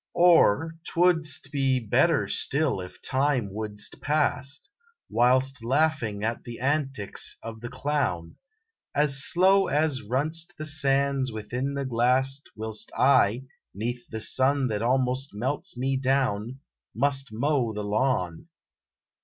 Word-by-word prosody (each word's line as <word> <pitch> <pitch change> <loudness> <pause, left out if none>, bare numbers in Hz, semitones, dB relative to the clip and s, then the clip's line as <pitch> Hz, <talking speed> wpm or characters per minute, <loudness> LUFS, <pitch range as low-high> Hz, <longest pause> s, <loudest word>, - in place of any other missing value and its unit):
Or 165 -3 +4
twouldst 165 -3 +1
be 135 -2 +1
better 110 -4 +2
still 140 -7 0
if 90 - -11
time 130 -6 0
wouldst 105 -1 -4
pass, 145 -2 -1 0.4
Whilst 130 +1 +2
laughin 130 -6 0
at 115 +2 -2
the 120 -1 -8
antics 135 -6 -2
of 110 -1 -8
the 120 - -6
clown, 125 - -2 0.6
As 140 -2 +4
slow 190 +2 +4
as 150 -2 0
run 130 +8 -1
st 165 0 -3
the 155 - -5
sands 140 -3 +1
within 125 +6 -4
the 140 -1 -2
glass 130 +3 +1
Whilst 110 0 -4
I, 125 -3 +3 0.3
neath 120 +4 -4 0.2
sun 135 0 +2
that 105 -1 -2
almost 130 +1 0
melts 125 +4 -3
me 135 +2 0
down, 130 -2 -1 0.3
Must 135 +1 0
mow 125 +1 0
the 105 -1 -5
lawn. 105 - -1
130 Hz, 125 wpm, -26 LUFS, 115-145 Hz, 0.6 s, Or